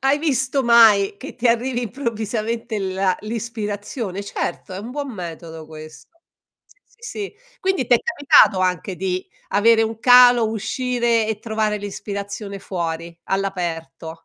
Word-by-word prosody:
hai 270 Hz, +2 st, +2 dB
visto 270 Hz, -3 st, 0 dB
mai, 220 Hz, -4 st, +6 dB
che -, -, -10 dB
ti 250 Hz, 0 st, 0 dB
arrivi 240 Hz, +1 st, +1 dB
improvvisamente 225 Hz, -2 st, -3 dB
la 190 Hz, -1 st, 0 dB
l'ispirazione. 210 Hz, -2 st, -5 dB
Certo, 200 Hz, -, -4 dB
è 185 Hz, -, -5 dB
un 225 Hz, +4 st, -7 dB
buon 280 Hz, -1 st, -5 dB
metodo 165 Hz, -4 st, -8 dB
questo. 155 Hz, 0 st, -12 dB, 0.6 s
Sì, -, -, -26 dB
sì, -, -, -32 dB
sì. 410 Hz, -2 st, -6 dB, 0.3 s
Quindi 375 Hz, -9 st, 0 dB
t'è 245 Hz, -, +5 dB
capitato 285 Hz, -, +4 dB
anche 185 Hz, +1 st, -1 dB
di 185 Hz, 0 st, -2 dB, 0.3 s
avere 225 Hz, +2 st, +4 dB
un 225 Hz, 0 st, -3 dB
calo, 245 Hz, -2 st, +7 dB
uscire 235 Hz, 0 st, 0 dB
e 215 Hz, -2 st, -2 dB
trovare 215 Hz, -1 st, -1 dB
l'ispirazione 200 Hz, 0 st, -6 dB
fuori, 170 Hz, -3 st, -4 dB
all'aperto. 165 Hz, -4 st, -4 dB
215 Hz, 135 wpm, -21 LUFS, 190-240 Hz, 0.6 s, calo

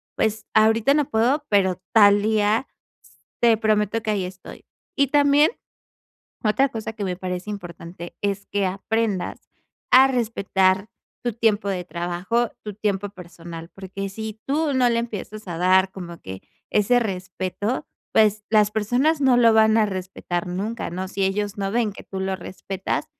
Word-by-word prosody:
pues, 220 Hz, -1 st, -1 dB
ahorita 220 Hz, +4 st, +4 dB
no 295 Hz, -2 st, +1 dB
puedo, 255 Hz, +7 st, +1 dB
pero 190 Hz, -3 st, +2 dB
tal 205 Hz, -2 st, +6 dB
día, 215 Hz, +3 st, +1 dB, 0.5 s
s -, -, -45 dB
te 230 Hz, -2 st, +5 dB
prometo 215 Hz, 0 st, +1 dB
que 215 Hz, -, 0 dB
ahí 195 Hz, -3 st, -1 dB
estoy". 185 Hz, +1 st, -11 dB, 0.3 s
Y 280 Hz, -, +4 dB
también, 290 Hz, +3 st, +4 dB, 0.9 s
otra 265 Hz, +6 st, +3 dB
cosa 220 Hz, -1 st, -5 dB
que 215 Hz, -, -6 dB
me 180 Hz, -1 st, -2 dB
parece 180 Hz, +2 st, -5 dB
importante, 175 Hz, -3 st, -8 dB
es 200 Hz, 0 st, -2 dB
que 205 Hz, -1 st, -1 dB
aprendas 200 Hz, 0 st, -2 dB, 0.4 s
a 260 Hz, +1 st, +9 dB
respetar 200 Hz, -5 st, +1 dB, 0.4 s
tu 240 Hz, -, 0 dB
tiempo 215 Hz, -3 st, +1 dB
de 180 Hz, -2 st, -2 dB
trabajo, 180 Hz, +7 st, -1 dB
tu 210 Hz, -2 st, -6 dB
tiempo 205 Hz, -1 st, -1 dB
personal, 170 Hz, -2 st, -10 dB
porque 195 Hz, +1 st, -6 dB
si 220 Hz, +2 st, -7 dB
tú 295 Hz, +1 st, +1 dB
no 250 Hz, -1 st, +4 dB
le 235 Hz, -1 st, +1 dB
empiezas 215 Hz, -3 st, -7 dB
a 170 Hz, -, -4 dB
dar 185 Hz, +2 st, +4 dB
como 170 Hz, -3 st, -8 dB
que 95 Hz, 0 st, -8 dB, 0.3 s
ese 215 Hz, +4 st, +3 dB
respeto, 190 Hz, +2 st, -3 dB, 0.3 s
pues 215 Hz, -1 st, +3 dB
las 210 Hz, -1 st, +4 dB
personas 245 Hz, +9 st, +1 dB
no 260 Hz, -3 st, +4 dB
lo 230 Hz, -2 st, +6 dB
van 220 Hz, 0 st, +5 dB
a 215 Hz, -, +4 dB
respetar 185 Hz, -2 st, -4 dB
nunca, 200 Hz, +6 st, -3 dB
¿no? 185 Hz, +2 st, -4 dB
Si 195 Hz, 0 st, -1 dB
ellos 205 Hz, +1 st, -1 dB
no 195 Hz, 0 st, -2 dB
ven 230 Hz, -3 st, +1 dB
que -, -, -12 dB
tú 190 Hz, -, -6 dB
lo 190 Hz, 0 st, -1 dB
respetas, 190 Hz, +1 st, -4 dB
205 Hz, 165 wpm, -23 LUFS, 190-225 Hz, 0.9 s, a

